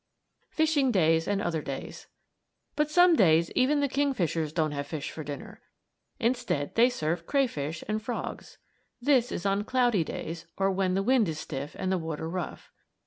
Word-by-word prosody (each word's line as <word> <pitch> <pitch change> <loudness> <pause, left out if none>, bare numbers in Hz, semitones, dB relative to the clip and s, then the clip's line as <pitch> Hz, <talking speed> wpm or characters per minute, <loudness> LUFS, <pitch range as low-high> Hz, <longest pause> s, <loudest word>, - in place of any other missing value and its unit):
FISHING 310 -5 +2
DAYS 165 -5 +3
AND 205 0 0
OTHER 165 -3 -1
DAYS 135 -2 -7 0.7
But 300 0 +1
some 355 +1 +6
days 165 - +4
even 285 +3 +2
the 285 - +2
kingfishers 190 - 0
don't 155 -1 0
have 140 -1 -4
fish 150 -2 -5
for 155 - -7
dinner. 200 - -8 0.6
Instead 235 - 0
they 240 +2 +5
serve 165 -7 -2
crayfish 165 - -1
and 215 +1 -1
frogs. 240 +3 -5 0.4
This 250 -2 +3
is 175 - -4
on 200 +1 +1
cloudy 240 -6 +2
days, 165 +1 -6
or 195 0 +2
when 190 -1 0
the 195 - +1
wind 240 -5 +3
is 155 - -4
stiff 145 -2 -6
and 185 - -1
the 190 - +1
water 160 -1 -4
rough. 175 0 -5
195 Hz, 170 wpm, -28 LUFS, 160-250 Hz, 0.7 s, some